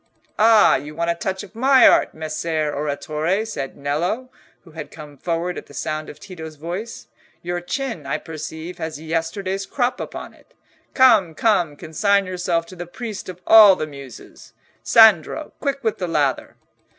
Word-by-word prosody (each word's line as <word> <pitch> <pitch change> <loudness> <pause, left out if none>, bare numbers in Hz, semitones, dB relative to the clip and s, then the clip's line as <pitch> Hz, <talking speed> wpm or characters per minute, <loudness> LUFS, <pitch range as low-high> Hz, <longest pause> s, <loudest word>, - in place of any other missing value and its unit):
"Ah! 220 0 +6
you 150 +1 -9
want 170 +1 0
a - - +1
touch 190 +2 -4
of 205 - -13
my 260 +3 +5
art, - - +3
Messer 155 -1 -2
Oratore," 155 +7 -2
said 135 -11 -6
Nello, 175 - -2 0.3
who 165 - -17
had 155 -2 -8
come 150 -2 -12
forward 170 +4 -3
at - - -15
the 145 - -15
sound 155 0 -4
of - - -11
Tito's 160 -5 -9
voice; 175 +9 -6 0.4
"your 175 0 -3
chin, 225 - -4
I 140 - -1
perceive, 160 +2 -8
has 160 -2 -5
yesterday's 170 +5 -3
crop 250 -2 -1
upon - - -7
it. - - -25 0.4
Come, 220 - +5
come—consign 195 +1 +1
yourself 175 -2 -1
to 185 - -13
the 175 -1 -7
priest 215 +1 -7
of 180 0 -9
all 215 -3 +8
the 155 - -3
Muses. 140 -4 -13 0.3
Sandro, 220 - +4
quick 280 -2 -3
with 220 -2 -1
the 180 - -2
lather!" 145 -5 -1
170 Hz, 165 wpm, -21 LUFS, 155-205 Hz, 0.4 s, all